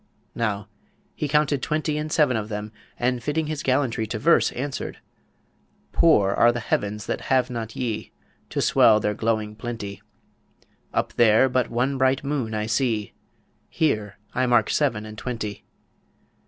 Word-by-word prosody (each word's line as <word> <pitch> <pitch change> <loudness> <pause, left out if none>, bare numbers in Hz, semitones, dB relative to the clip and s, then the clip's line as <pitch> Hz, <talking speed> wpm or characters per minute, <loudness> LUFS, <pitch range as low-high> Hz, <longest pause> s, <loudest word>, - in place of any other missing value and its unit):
Now, 105 -3 -2 0.5
he 150 - -3
counted 145 -2 +2
twenty 155 +1 -1
and 150 0 -3
seven 150 -6 +3
of 110 -1 -3
them, 105 0 -5 0.3
and, 125 0 0
fitting 150 +5 -1
his 155 -1 -3
gallantry 125 -5 0
to 110 - -3
verse, 165 +10 +4
answered: 135 +2 -4 0.9
Poor 105 -13 +4
are 120 +4 +5
the 120 - -3
heavens 105 -1 -2
that - - -3
have 130 -1 +2
not 115 -2 -5
ye 115 -4 -3 0.4
To - - -2
swell 110 -2 +5
their 105 0 0
glowing 110 -1 -1
plenty; 105 -3 -6 0.9
Up - - -1
there 115 +2 +5
but 130 -1 0
one 130 +3 0
bright 130 +1 +2
moon 135 -6 -2
I 105 0 -1
see, 110 -2 0 0.6
Here 110 -10 0 0.2
mark 120 -3 +3
I - - 0
seven 120 -8 +1
and 110 -1 -9
twenty. 110 -5 -5
120 Hz, 155 wpm, -24 LUFS, 110-135 Hz, 0.9 s, are